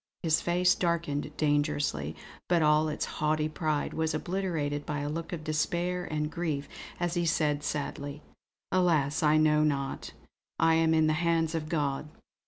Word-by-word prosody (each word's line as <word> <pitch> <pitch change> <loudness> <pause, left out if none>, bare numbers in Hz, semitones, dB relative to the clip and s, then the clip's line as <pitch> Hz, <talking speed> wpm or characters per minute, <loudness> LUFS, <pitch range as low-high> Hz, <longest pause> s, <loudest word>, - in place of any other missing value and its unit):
His 160 -1 +3
face 180 +1 +3
darkened 170 -5 -1
dangerously; 145 - 0 0.3
but 170 -2 +3
all 150 +1 +4
its 150 - -2 0.2
haughty 155 0 +2
pride 155 -1 -1
was 160 -1 -1
obliterated 155 -5 -2
by 145 -1 -3
a 145 - -2
look 165 +2 -4
of 165 -3 -5
despair 175 +3 -1
and 150 -1 -2
grief 155 -5 -2 0.3
as 175 -1 -1
he 175 -1 0
said 150 -2 +1
sadly: 145 0 -4 0.5
"Alas 165 -5 +2
I 155 -1 +4
know 155 0 +4
not. 140 -3 -2 0.4
I 165 - +4
am 160 0 +3
in 160 0 +4
the 155 - +3
hands 165 0 +1
of 155 -1 -3
God! 145 -2 -1
155 Hz, 160 wpm, -29 LUFS, 150-165 Hz, 0.5 s, all